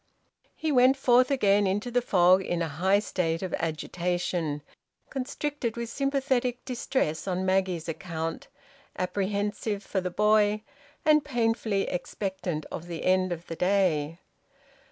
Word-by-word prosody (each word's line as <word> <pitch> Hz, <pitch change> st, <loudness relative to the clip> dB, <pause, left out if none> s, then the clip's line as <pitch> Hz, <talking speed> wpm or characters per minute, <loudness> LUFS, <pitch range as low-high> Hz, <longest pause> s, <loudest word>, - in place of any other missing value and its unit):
He 315 Hz, -, -1 dB
went 260 Hz, 0 st, +5 dB
forth 255 Hz, -1 st, +4 dB
again 205 Hz, -7 st, +3 dB
into 210 Hz, +6 st, -1 dB
the 245 Hz, +1 st, +2 dB
fog 185 Hz, -4 st, +4 dB
in 175 Hz, -2 st, -1 dB
a -, -, -1 dB
high 185 Hz, +7 st, +2 dB
state 175 Hz, -4 st, -1 dB
of 185 Hz, -, -4 dB
agitation, 165 Hz, -1 st, -2 dB, 0.5 s
constricted 270 Hz, -2 st, -3 dB
with 235 Hz, -1 st, -3 dB
sympathetic 265 Hz, -3 st, 0 dB
distress 245 Hz, -, -1 dB
on 185 Hz, 0 st, -1 dB
Maggie's 185 Hz, -3 st, 0 dB
account, 165 Hz, 0 st, -4 dB, 0.5 s
apprehensive 200 Hz, +2 st, -2 dB
for 190 Hz, -, -2 dB
the 180 Hz, -, -2 dB
boy, 210 Hz, +2 st, +3 dB, 0.4 s
and 305 Hz, -1 st, +5 dB
painfully 225 Hz, -6 st, 0 dB
expectant 180 Hz, -3 st, -3 dB
of 170 Hz, -, -6 dB
the 170 Hz, -2 st, -5 dB
end 185 Hz, 0 st, +3 dB
of 170 Hz, 0 st, -4 dB
the 165 Hz, -, -6 dB
day. 170 Hz, -5 st, +1 dB
195 Hz, 135 wpm, -27 LUFS, 175-240 Hz, 0.5 s, went